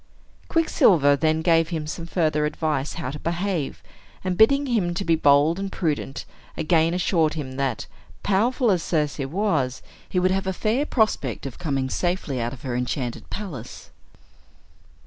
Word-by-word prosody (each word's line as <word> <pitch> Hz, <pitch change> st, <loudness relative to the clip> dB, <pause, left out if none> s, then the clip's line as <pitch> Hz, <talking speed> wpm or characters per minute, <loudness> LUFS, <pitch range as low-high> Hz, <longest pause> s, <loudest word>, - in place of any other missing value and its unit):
Quicksilver 170 Hz, -, +4 dB
then 155 Hz, +2 st, +1 dB
gave 165 Hz, -1 st, +3 dB
him 160 Hz, -3 st, -3 dB
some 165 Hz, +2 st, -6 dB
further 155 Hz, -4 st, +1 dB
advice 150 Hz, -2 st, -2 dB
how 165 Hz, -6 st, -4 dB
to 150 Hz, -, -7 dB
behave, 170 Hz, -2 st, -2 dB, 0.4 s
and 185 Hz, -1 st, -1 dB
bidding 275 Hz, +8 st, +5 dB
him 215 Hz, -9 st, 0 dB
be 170 Hz, -2 st, 0 dB
bold 145 Hz, +3 st, +4 dB
and 195 Hz, 0 st, -3 dB
prudent, 150 Hz, -5 st, -2 dB, 0.3 s
again 165 Hz, +1 st, +2 dB
assured 165 Hz, -4 st, +1 dB
him 145 Hz, -4 st, -5 dB
that, 135 Hz, -5 st, -1 dB, 0.4 s
powerful 230 Hz, +4 st, +2 dB
as 180 Hz, -3 st, +1 dB
Circe 150 Hz, -3 st, -1 dB
was, 135 Hz, -3 st, -1 dB, 0.3 s
he -, -, -3 dB
would 185 Hz, +1 st, +3 dB
have 190 Hz, 0 st, -1 dB
a 190 Hz, -, 0 dB
fair 230 Hz, +10 st, 0 dB
prospect 215 Hz, -, 0 dB
of 135 Hz, -, -7 dB
coming 135 Hz, -6 st, -1 dB
safely 160 Hz, -4 st, -2 dB
out 120 Hz, +1 st, -2 dB
of 130 Hz, -, -11 dB
her 125 Hz, -3 st, -3 dB
enchanted 125 Hz, 0 st, -3 dB
palace. 160 Hz, -, -7 dB
165 Hz, 155 wpm, -24 LUFS, 140-190 Hz, 0.4 s, bidding